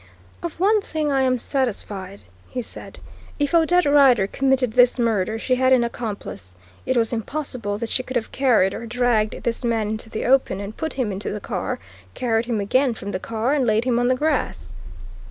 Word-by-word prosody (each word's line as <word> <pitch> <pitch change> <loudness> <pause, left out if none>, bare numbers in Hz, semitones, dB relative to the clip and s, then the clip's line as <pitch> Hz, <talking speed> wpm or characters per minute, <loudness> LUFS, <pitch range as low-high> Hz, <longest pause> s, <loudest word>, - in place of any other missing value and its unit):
"Of 340 -1 -6
one 415 +3 +4
thing 310 -6 -2
I 270 -1 +2
am 255 -1 +2
satisfied," 205 -7 -3 0.3
he 250 - -4
said; - - -8 0.4
"if 290 +2 -1
Odette 340 +1 +4
Rider 275 -8 +5
committed 265 +1 +1
this 245 +1 +5
murder 220 -3 0
she 255 +3 0
had 260 0 +3
an 255 -2 +5
accomplice. 205 - -6 0.3
It 260 - +1
was 230 0 +1
impossible 235 -3 -3
that 230 +1 -4
she 255 - +1
could 260 0 -8
have 235 -2 -1
carried 230 -8 +3
or 230 - -6
dragged 235 -2 0
this 235 +1 -2
man 225 -3 0
into 220 +1 -5
the 220 - -4
open 255 -6 +3
and 200 +2 -6
put 320 -2 -4
him 250 -6 -1
into 195 +2 -4
the 210 - -4
car, - - -3 0.4
carried 230 -2 0
him 230 -3 0
again 250 +5 +2
from 200 -1 -6
the 185 - -3
car 230 +6 -1
and 290 -3 +2
laid 220 -1 +2
him 245 -2 +1
on 245 - +2
the 255 - +3
grass." 265 - -1
240 Hz, 200 wpm, -22 LUFS, 215-265 Hz, 0.4 s, Rider